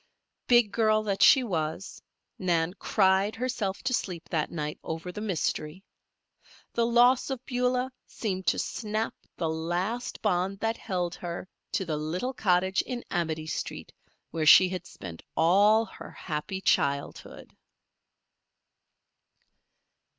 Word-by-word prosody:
Big 240 -4 +5
girl 215 -1 +2
that 200 -2 -2
she 265 - +7
was, 165 -4 -3 0.4
Nan 175 -2 +1
cried 195 +1 +2
herself 225 -5 -3
to 260 0 0
sleep 180 -8 -3
that 155 -3 0
night 150 -2 -4
over 165 +2 -5
the 210 - -7
mystery. 180 -3 -2 0.9
The 235 -1 +2
loss 245 +3 +4
of 260 -2 -4
Beulah 250 +1 0 0.2
seemed 190 -4 -4
to - - +3
snap 215 0 -2 0.2
the 165 - -1
last 175 +9 -2
bond 195 -1 +1
that 225 +2 -1
held 180 -4 -2
her 175 +1 -6 0.3
to 190 - 0
the 155 -3 -2
little 175 - -3
cottage 190 -3 +2
in 245 -2 -5
Amity 160 -3 -1
street, 160 - -5 0.4
where 160 -2 -1
she 185 +4 +9
had 180 -2 -5
spent 85 -3 -9 0.2
all 205 +7 +5
her - - -11
happy 165 +4 -5
childhood. 140 -5 -1
190 Hz, 130 wpm, -28 LUFS, 165-225 Hz, 0.9 s, she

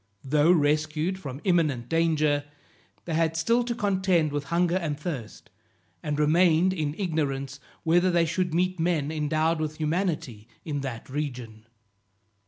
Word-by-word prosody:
Though 150 +4 +3
rescued 155 +3 +1
from 140 -4 -7
imminent 155 - +1
danger, 155 -3 +1 0.6
they 170 - -3
had 165 0 +1
still 230 +8 +2
to 235 -1 -2
contend 190 -7 +1
with 145 -1 -3
hunger 175 +3 +1
and 155 -5 -3
thirst, 145 -9 -6 0.5
and 150 -1 -2
remained 170 +3 +4
in 155 -4 -2
ignorance 140 -7 -2 0.2
whether 175 +3 +3
they 170 -1 +3
should 180 +2 -1
meet 185 +2 0
men 160 -3 0
endowed 155 +1 0
with 155 0 -3
humanity 155 - -2 0.2
in 145 -3 -3
that 130 -4 -6
region. 125 -6 -5
155 Hz, 140 wpm, -26 LUFS, 145-175 Hz, 0.6 s, remained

